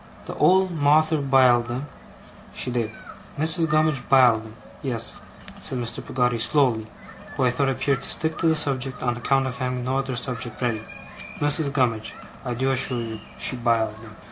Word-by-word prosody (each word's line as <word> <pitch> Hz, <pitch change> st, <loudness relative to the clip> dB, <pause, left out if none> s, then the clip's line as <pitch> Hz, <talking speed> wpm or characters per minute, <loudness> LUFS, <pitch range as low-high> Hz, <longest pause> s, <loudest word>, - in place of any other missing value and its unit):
The -, -, -6 dB
old 190 Hz, 0 st, +4 dB
Mawther 155 Hz, 0 st, +3 dB
biled 130 Hz, -3 st, +4 dB
'em, 125 Hz, +4 st, -4 dB, 0.7 s
she 125 Hz, -, -2 dB
did. 120 Hz, -3 st, -1 dB, 0.5 s
Mrs. 160 Hz, +2 st, +3 dB
Gummidge 155 Hz, -3 st, +2 dB
biled 125 Hz, -5 st, +5 dB
'em. 110 Hz, -, -14 dB, 0.3 s
Yes,' 120 Hz, -4 st, -3 dB, 0.4 s
said 130 Hz, -, -4 dB
Mr. 120 Hz, -1 st, -3 dB
Peggotty, 125 Hz, -2 st, 0 dB
slowly, 115 Hz, -4 st, +1 dB, 0.5 s
who -, -, 0 dB
I 125 Hz, -, +3 dB
thought 135 Hz, +2 st, 0 dB
appeared 135 Hz, +1 st, 0 dB
to -, -, -4 dB
stick 160 Hz, 0 st, 0 dB
to 165 Hz, -, +2 dB
the 160 Hz, -, +3 dB
subject 135 Hz, -3 st, 0 dB
on 120 Hz, -1 st, 0 dB
account 135 Hz, +3 st, +1 dB
of 125 Hz, -1 st, -5 dB
having 125 Hz, -1 st, -2 dB
no 130 Hz, +1 st, 0 dB
other 135 Hz, -2 st, -3 dB
subject 120 Hz, -2 st, -4 dB
ready, 115 Hz, -4 st, -1 dB, 0.6 s
'Mrs. 145 Hz, 0 st, +2 dB
Gummidge, 120 Hz, -6 st, -1 dB, 0.3 s
I 125 Hz, -1 st, -3 dB
do 130 Hz, +3 st, 0 dB
assure 130 Hz, -1 st, +1 dB
you, 110 Hz, -2 st, -5 dB, 0.2 s
she -, -, 0 dB
biled 115 Hz, -3 st, 0 dB
'em. 110 Hz, -1 st, -13 dB
130 Hz, 175 wpm, -24 LUFS, 120-140 Hz, 0.7 s, biled